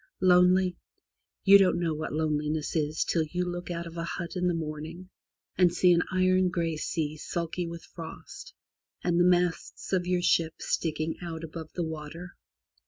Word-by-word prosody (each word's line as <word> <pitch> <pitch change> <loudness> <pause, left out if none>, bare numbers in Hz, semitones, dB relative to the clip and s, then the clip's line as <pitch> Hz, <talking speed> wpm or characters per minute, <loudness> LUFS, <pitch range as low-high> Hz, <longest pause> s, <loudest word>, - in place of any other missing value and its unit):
Lonely? 180 0 +4 0.6
You 200 0 +8
don't 190 -2 +3
know 165 -2 0
what 155 +1 -4
loneliness 150 0 -1
is 155 0 0
till 165 - +1
you 180 +3 -2
look 175 0 -5
out 170 -1 -3
of 165 0 -9
a 165 - -2
hut 170 +1 -5
in 180 0 0
the 175 - +1
morning 160 +3 -6 0.5
and 180 -2 +6
see 180 +1 +4
an 170 - +3
iron 185 0 +3
grey 170 -2 -1
sea 155 -1 -2
sulky 170 +2 -3
with 170 0 -7
frost, 170 - -10 0.5
and 175 -1 +2
the - - +6
masts 180 +1 +1
of 180 -1 +1
your 180 -1 +1
ship 165 -2 +2
sticking 155 0 -2
out 165 -2 -6
above 160 0 -8
the 175 - -2
water. 160 +3 -7
170 Hz, 170 wpm, -28 LUFS, 160-180 Hz, 0.6 s, You